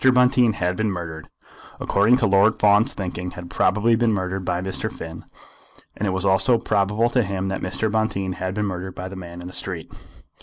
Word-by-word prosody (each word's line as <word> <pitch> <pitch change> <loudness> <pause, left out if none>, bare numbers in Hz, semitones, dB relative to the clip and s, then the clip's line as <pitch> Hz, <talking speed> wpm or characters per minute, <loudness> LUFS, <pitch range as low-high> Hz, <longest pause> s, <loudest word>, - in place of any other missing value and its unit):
Bonteen 125 -2 +4
had 90 -2 -1
been 110 -1 0
murdered; 85 -4 -6 0.5
according 105 +5 +3
to 125 - +1
Lord 100 +2 +4
Fawn's 105 +5 +4
thinking 90 -1 -4
had 90 -1 -8
probably 105 +5 +3
been 115 0 +2
murdered 95 -1 -2
by 90 -1 -1
Mr. 95 +1 -3
Finn. 80 0 -9 0.7
And 105 - -2
it - - +1
was 95 +1 -2
also 95 +5 +4
probable 105 +2 +1
to 125 - +3
him 95 -2 -2
that 95 - -3
Mr. 95 +4 -1
Bonteen 100 -4 -1
had 95 +1 -3
been 105 0 0
murdered 95 -1 -5
by 95 +1 -6
the 95 - -8
man 90 -1 -8
in 90 - -8
the 90 - -9
street. 85 -4 -4
95 Hz, 200 wpm, -23 LUFS, 90-110 Hz, 0.7 s, Bonteen